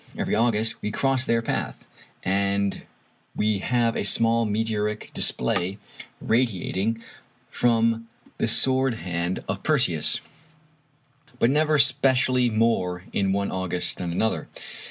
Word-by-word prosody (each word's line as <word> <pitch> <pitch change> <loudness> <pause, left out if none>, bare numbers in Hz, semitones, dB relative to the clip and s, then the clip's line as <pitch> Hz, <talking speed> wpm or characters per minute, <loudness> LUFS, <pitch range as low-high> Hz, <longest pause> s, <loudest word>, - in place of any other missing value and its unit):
Every - - -2
August 115 0 +1
we - - -2
cross 130 +3 0
their 115 0 +1
path, - - -3 0.4
and 100 +1 0 0.5
we 105 -1 +1
have 115 +2 +1
a - - -1
small 115 +3 +2
meteoric 105 0 -2
display 90 +10 +1 0.4
radiating 115 -1 -1 0.5
from 115 -1 +1 0.3
the - - +1
sword 130 +2 +3
hand 90 -3 -3
of - - -3
Perseus, - - +1 1.2
but 120 +1 +3
never 155 +1 +2
specially 130 -3 +3
more 110 -6 0
in 95 -1 +1
one 100 0 -1
August 95 -1 -2
than 90 -2 -3
another. 110 +6 -1
115 Hz, 115 wpm, -24 LUFS, 100-120 Hz, 1.2 s, sword